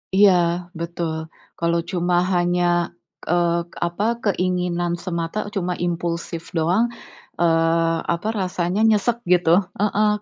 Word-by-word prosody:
Iya 200 0 +7 0.5
betul. 170 -1 -3 0.5
Kalau 170 0 +1
cuma 175 -1 +1 0.2
hanya, 175 0 +2 0.7
eee, 170 0 +2 0.3
apa, 175 +4 -3 0.2
keinginan 180 -3 0
semata 170 +2 -3 0.2
cuma 180 -2 -1
impulsif 170 -1 -3 0.2
doang, 180 +9 +3 0.6
eee, 165 0 +3 0.2
apa 170 +5 -4
rasanya 180 +1 -1
nyesek 220 +3 +2 0.2
gitu 175 -2 +2 0.3
heeh, 210 0 +2
175 Hz, 105 wpm, -22 LUFS, 170-185 Hz, 0.7 s, Iya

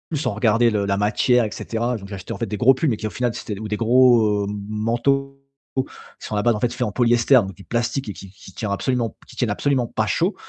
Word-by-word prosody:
sans 140 -7 -1
regarder 115 +2 +3
le 100 -2 0
la 100 0 0
matière 110 +4 +2
et 105 - -5
cetera. 115 +1 -2
Donc, 100 -1 -10
j'achetais 100 +1 -8
en - - -6
fait 115 - -2
des 105 - -4
gros 130 +2 +6
pulls, 155 +4 0
mais 110 - 0
qui 110 - -3
au - - -4
final, 120 0 -1
c'était 105 - -5
des - - -9
ou 110 - -5
des 105 0 -2
gros 115 -4 +4 0.2
manteaux 135 +6 0 0.4
qui 130 - +2 0.4
sont 105 - -4
à - - 0
la 105 - 0
base 120 -2 +3
faits 120 0 -2
en 105 - -1
polyester, 120 +2 +2
donc 95 -7 +2
du 100 - -14
plastique 120 +1 -2
et - - -4
qui 95 - -11
qui 100 -1 -15
tient 105 - -4
absolument 120 +2 -1
qui - - -14
tiennent 120 -4 0
absolument 125 +2 0
pas 110 - -1
chaud 175 - 0
115 Hz, 255 wpm, -22 LUFS, 105-125 Hz, 0.4 s, gros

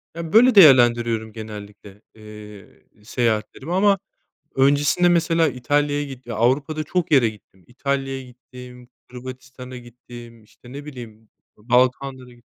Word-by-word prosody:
Ya 165 -1 -7
böyle 245 +3 +6
değerlendiriyorum 120 - +5
genellikle, 105 -2 -11
eee, 105 -1 -15
seyahatlerimi. 120 +7 -2
Ama 195 +1 +3 0.6
öncesinde 145 +6 +3
mesela 165 -1 +2
İtalya'ya 145 +3 -1
gittim. 130 -4 -9
Avrupa'da 140 +7 0
çok 170 +1 -2
yere 130 -6 +5
gittim. 100 -3 -15
İtalya'ya 135 +1 -3
gittim, 125 0 -14 0.2
Hırvatistan'a 130 0 -10
gittim, 120 -1 -13
işte 120 +3 -18
ne 140 +1 -8
bileyim 115 -6 -11 0.3
Balkanlar'a 125 +3 0
gittim. 120 -1 -22
125 Hz, 115 wpm, -21 LUFS, 115-145 Hz, 0.6 s, böyle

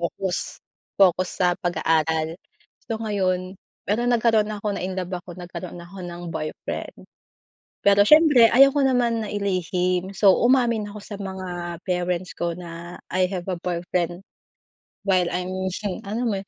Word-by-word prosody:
focus, 180 +2 -3 0.4
focus 185 -1 +4 0.2
sa 180 - +4
pag-aaral. 160 -2 +1 0.6
So 225 - -1
ngayon 185 -4 -1 0.3
pero 235 +4 0
nagkaroon 225 -3 +3
na 215 - -4
ako, 205 -1 -1
na-inlove 185 0 -4
ako 175 0 -11
nagkaroon 180 0 -7
ako 175 +3 -10
ng 175 -1 -7
boyfriend. 155 0 -5 0.8
Pero 200 0 +7
siyempre 295 -2 +7
ayoko 275 +3 +6
naman 245 -3 +2
na 215 - -5
ilihim 185 -2 -1
so 195 -1 +5
umamin 235 -4 +3
ako 210 - -8
sa 205 +1 -9
mga 180 -3 -5
parents 180 0 -1
ko 170 - -2
na, 170 0 -8
"I 185 0 0
have 180 -2 -4
a 185 - -1
boyfriend, 175 +1 -2 0.8
while 185 -2 +2
I'm 180 +1 -2 0.6
alam 230 +4 -1
mo 200 - 0
'yun 195 - -11
185 Hz, 140 wpm, -24 LUFS, 175-210 Hz, 0.8 s, Pero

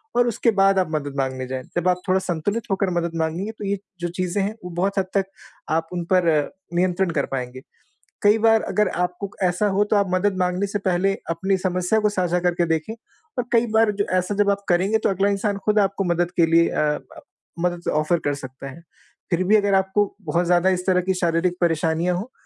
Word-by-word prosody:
और 245 0 +4
उसके 230 0 +1
बाद 195 0 +5
आप 185 - +1
मदद 145 -3 -3
माँगने 130 -1 -2
जाएँ। 130 0 -4
जब 175 +1 0
आप 180 0 0
थोड़ा 185 0 +3
संतुलित 190 +5 -2
होकर 195 0 +1
मदद 170 0 -2
माँगेंगे 165 +6 -2
तो 220 -2 -8
ये 200 +1 0 0.2
जो 175 - -2
चीज़ें 185 +2 -1
हैं 205 +2 -2
वो - - -5
बहुत 195 +4 0
हद 190 - 0
तक 195 - +2 0.4
आप 165 +1 0
उन 175 -1 -3
पर 180 -2 +3
अ, 150 -3 +2 0.3
नियंत्रण 180 +1 +1
कर 140 - 0
पाएँगे, 130 -1 -4 0.6
कई 210 +2 +5
बार 225 0 +4
अगर 210 -2 +1
आपको 180 +3 -3
ऐसा 180 +3 +2
हो 200 +1 +2
तो 210 +1 0
आप 200 -1 +3
मदद 185 +1 +1
माँगने 180 +2 0
से 205 +1 -3
पहले 190 0 +1 0.2
अपनी 190 +4 0
समस्या 185 +3 0
को 210 -1 +2
साझा 180 -3 0
करके 175 -1 +1
देखें 160 +5 -1 0.5
और 245 - -1
कई 230 0 +4
बार 220 -1 +4
ज 200 - +2
ऐसा 185 +2 0
जब 205 0 +2
आप 200 0 -2
करेंगे 190 +5 +3
तो - - +1
अगला 195 +1 +1
इंसान 200 0 -1
खुद 210 0 +3
आपको 195 -1 +1
मदद 175 +1 -1
के 165 - +7
लिए 165 +1 +4
अ, 150 -1 0 0.6
मदद 175 0 -1
ऑफ़र 155 +3 +1
कर 145 - +1
सकता 135 0 -8
है। 165 - -13 0.5
फिर 175 +1 +2
भी 215 - +5
अगर 205 -1 +1
आपको 190 +2 +2 0.2
बहुत 175 -2 0
ज़्यादा 175 +1 +3
इस 180 -1 -1
तरह 180 -1 +3
की 190 +1 0
शारीरिक 175 0 +1
परेशानियाँ 165 +1 +1
हो 215 +8 -6
185 Hz, 220 wpm, -22 LUFS, 170-200 Hz, 0.6 s, के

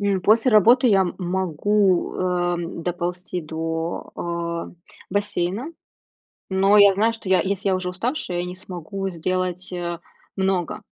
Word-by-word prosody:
М, 200 -2 +1
после 225 +6 +4
работы 235 +5 +6
я, 195 -3 +5
м, 185 -2 0
могу, 185 +1 +1
э, 175 -1 0 0.3
доползти 175 +1 -3
до, 165 +1 -4
э, 170 -1 -4 0.4
бассейна, 205 - -1 0.8
но 195 +2 +4
я 200 -1 +7
знаю, 220 +4 +2
что 225 -4 -9
я 190 - +4
я, - - +4
если 195 0 -1
я 190 - +3
уже 185 0 -2
уставшая, 185 - -3
я 175 - -1
не 180 0 -6
смогу 190 +2 -5
сделать, 185 +1 -3
э, 175 -1 -3 0.4
много, 190 -2 -1
185 Hz, 150 wpm, -23 LUFS, 175-200 Hz, 0.8 s, я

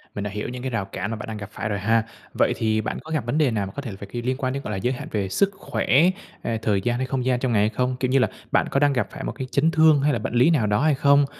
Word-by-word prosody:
mình 100 - -3
đã 105 - -3
hiểu 105 +1 -4
những 125 0 -6
cái 130 - -2
rào 115 -5 -1
cản 100 +2 -5
mà - - -2
bạn 105 - -7
đang 110 -1 -5
gặp 100 -1 -7
phải 110 - -4
rồi 100 -1 -1
ha. 115 +3 +2 0.3
Vậy - - +2
thì 110 -1 +1
bạn - - -3
có 160 - -10
gặp 150 -7 -1
vấn 120 +5 -1
đề 150 -5 +3
nào 105 -3 -1
mà 95 - -7
có - - -3
thể 120 -8 -6
phải, 100 +1 -9
kiểu, 120 - -3
liên 130 0 0
quan 130 -2 -1
đến, 140 +1 -4
gọi - - -4
là, 100 - -2
giới 125 +7 0
hạn 125 - -7
về 100 -3 -1
sức 195 - +2
khỏe, - - -4
hay 165 +8 +5 0.4
là - - 0
thời 105 -4 +1
gian, 120 +4 0
hay 130 - -1
không 130 -1 -2
gian 125 -1 +2
trong 130 -1 -1
ngày 105 - +4
hay 105 - +3
không? 125 +3 -1
Kiểu 130 -1 0
như 135 - +4
là, 125 - +3 0.2
bạn - - +2
có 140 - +2
đang 145 0 +3
gặp 125 - 0
phải - - -7
một - - -2
cái 130 - -6
chấn 155 +4 +3
thương 160 -3 +5
hay 145 +1 +2
là 120 - 0
bệnh 105 - -4
lý 125 +6 +5
nào 140 -10 +2
đó 105 +3 +2
hay 155 -2 +4
không? 140 +1 +4
125 Hz, 360 wpm, -24 LUFS, 105-140 Hz, 0.4 s, hay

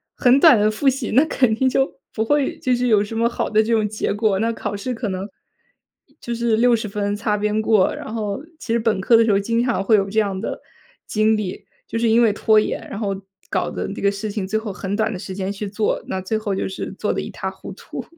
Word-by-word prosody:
很 255 +1 +4
短 305 -8 +7
的 210 +1 +3
复 215 +6 -2
习， 265 -3 +1
那 275 +7 +5
肯 255 -7 +2
定 260 +3 +1
就 270 +1 0
不 220 - 0
会 290 +3 +1
就 255 -1 +1
是 250 +1 0
有 210 -3 +4
什 225 +2 -6
么 230 +1 +3
好 235 - -2
的 215 0 +3
这 230 +1 0
种 215 -2 +2
结 210 -1 -2
果。 210 -2 +1
那 230 +2 0
考 205 - -4
试 250 +5 -3
可 225 -3 -3
能， 190 +2 -4 0.9
就 235 0 -4
是 235 -1 +1
60 235 -2 +3
分 205 0 -2
擦 210 0 0
边 210 +1 0
过， 215 -3 +3
然 215 - -7
后 215 +4 -3 0.2
其 225 - -5
实 235 - +3
本 215 -4 0
科 230 +3 +5
的 225 - +4
时 215 - +2
候 200 - +3
经 230 +3 0
常 235 -6 0
会 215 +2 +4
有 195 -1 +2
这 220 - +2
样 195 -3 -1
的 - - -4 0.5
经 215 +1 +2
历。 200 -4 -5 0.2
就 230 - -3
是 230 -1 +2
因 235 +2 +5
为 215 -3 +4
拖 215 0 +4
延， - - -3
然 200 - -6
后 200 -3 -2 0.4
搞 - - 0
得 - - -4
这 - - -7
个 200 - +3
事 200 +1 -4
情 200 -3 -3
最 220 +2 0
后 215 -3 -4
很 195 +2 -4
短 215 0 0
的 180 - -5
时 190 -2 -7
间 195 0 -2
去 205 0 -5
做， 210 +1 -1
那 190 - -2
最 215 +4 -2
后 205 -3 -2
就 - - -2
是 190 - -5
做 - - -1
得 - - -2
一 - - -6
塌 - - -4
糊 - - -10
涂。 - - -8
215 Hz, 280 characters per minute, -21 LUFS, 205-230 Hz, 0.9 s, 短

